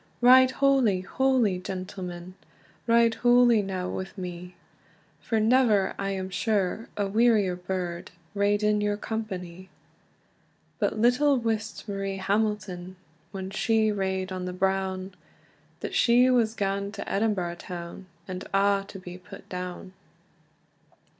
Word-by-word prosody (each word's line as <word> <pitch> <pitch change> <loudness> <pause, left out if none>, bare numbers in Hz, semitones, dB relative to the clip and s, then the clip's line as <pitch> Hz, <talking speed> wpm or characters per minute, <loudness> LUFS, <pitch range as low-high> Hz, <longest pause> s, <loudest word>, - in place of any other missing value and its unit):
"Ride 255 +1 +7
hooly, 260 -8 +2
hooly, 245 -3 +1
gentlemen, 185 -2 -6 0.5
Ride 230 0 +4
hooly 240 -2 +5
now 190 -2 -3
wi' 190 +1 -4
me! 180 -1 -7 0.6
For 225 - -1
never, 220 -4 +3
I 195 0 -1
am 190 -1 -4
sure, 205 +2 -1
a 205 - +1
wearier 210 -3 +3
burd 180 -1 -4 0.2
Rade 205 +1 +1
in 210 0 +2
your 205 0 0
cumpanie." 190 -5 -6 1.1
But - - 0
little 250 +5 +3
wist 225 -2 -3
Marie 195 -1 -3
Hamilton, 195 -2 -2 0.4
When 190 -1 -6
she 220 +1 +2
rade 190 -2 -2
on 185 -1 -4
the 180 - -4
brown, 190 0 -1 0.7
That - - -5
she 245 +2 +4
was 230 -3 +2
ga'en 200 0 -2
to 200 - -6
Edinburgh 195 -5 -1
town, 175 +1 -8 0.2
And 185 -1 -5
a' 200 0 +3
to 200 - -9
be 180 -1 -9
put 195 +2 -13
down. 180 +1 -6
195 Hz, 125 wpm, -26 LUFS, 185-220 Hz, 1.1 s, Ride